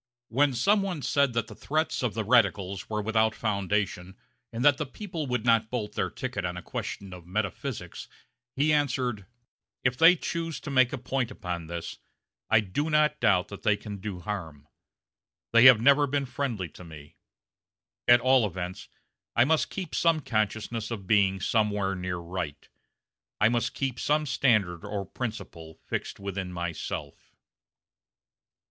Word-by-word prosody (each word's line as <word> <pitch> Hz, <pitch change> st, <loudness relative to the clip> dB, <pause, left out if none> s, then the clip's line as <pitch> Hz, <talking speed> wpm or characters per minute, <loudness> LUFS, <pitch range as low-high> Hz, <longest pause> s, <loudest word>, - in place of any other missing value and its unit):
When 140 Hz, +3 st, +3 dB
some 200 Hz, -, +3 dB
one 180 Hz, -7 st, -3 dB
said 130 Hz, 0 st, +2 dB
that 115 Hz, -, 0 dB
the -, -, -11 dB
threats 155 Hz, +2 st, -1 dB
of 120 Hz, -5 st, -1 dB
the 110 Hz, -, -1 dB
radicals 100 Hz, -5 st, +2 dB
were 105 Hz, -1 st, -2 dB
without 110 Hz, 0 st, +2 dB
foundation, 100 Hz, -3 st, -2 dB, 0.3 s
and 120 Hz, +3 st, -2 dB
that 145 Hz, -2 st, +6 dB
the 150 Hz, -, -2 dB
people 170 Hz, -1 st, -5 dB
would 125 Hz, -2 st, -2 dB
not 115 Hz, -2 st, +3 dB
bolt 110 Hz, -4 st, -3 dB
their -, -, -1 dB
ticket 130 Hz, -7 st, -4 dB
on 90 Hz, 0 st, -3 dB
a 90 Hz, -, -7 dB
question 95 Hz, -2 st, -5 dB
of 90 Hz, -2 st, -11 dB
metaphysics, 95 Hz, 0 st, -4 dB, 0.5 s
he 150 Hz, +3 st, +3 dB
answered: 125 Hz, -8 st, 0 dB, 0.6 s
"If 125 Hz, -1 st, +2 dB
they 165 Hz, +6 st, +7 dB
choose 165 Hz, -1 st, -4 dB
to 150 Hz, -, -6 dB
make 130 Hz, -2 st, +4 dB
a 145 Hz, -, -3 dB
point 125 Hz, 0 st, -2 dB
upon 90 Hz, -8 st, -5 dB
this, 85 Hz, 0 st, -6 dB, 0.5 s
I 110 Hz, -, +5 dB
do 125 Hz, +11 st, -2 dB
not 150 Hz, 0 st, +3 dB
doubt 95 Hz, -6 st, +3 dB
that 100 Hz, -, -9 dB
they 105 Hz, -2 st, +2 dB
can 105 Hz, -1 st, -7 dB
do 95 Hz, -2 st, -6 dB
harm. 80 Hz, -8 st, -6 dB, 0.9 s
They 115 Hz, +1 st, +7 dB
have 125 Hz, -4 st, +10 dB
never 140 Hz, +4 st, +5 dB
been 140 Hz, 0 st, 0 dB
friendly 120 Hz, -8 st, -3 dB
to 90 Hz, -, -13 dB
me. 75 Hz, -3 st, -12 dB, 0.9 s
At 120 Hz, 0 st, +7 dB
all 130 Hz, -3 st, +4 dB
events, 90 Hz, 0 st, -6 dB, 0.5 s
I 120 Hz, -, +5 dB
must 160 Hz, +2 st, +2 dB
keep 185 Hz, -5 st, -6 dB
some 165 Hz, -2 st, +2 dB
consciousness 110 Hz, -1 st, -2 dB
of 110 Hz, -5 st, -5 dB
being 95 Hz, -1 st, +3 dB
somewhere 105 Hz, -1 st, +1 dB
near 90 Hz, -1 st, -3 dB
right. 85 Hz, -3 st, -5 dB, 0.7 s
I 105 Hz, -, +5 dB
must 120 Hz, +2 st, -1 dB
keep 130 Hz, -4 st, -2 dB
some 150 Hz, +1 st, +1 dB
standard 105 Hz, -, +1 dB
or 100 Hz, -1 st, -4 dB
principle 85 Hz, -10 st, -6 dB
fixed -, -, -4 dB
within 100 Hz, -2 st, -4 dB
myself." 85 Hz, -2 st, -6 dB
110 Hz, 160 wpm, -28 LUFS, 95-135 Hz, 0.9 s, have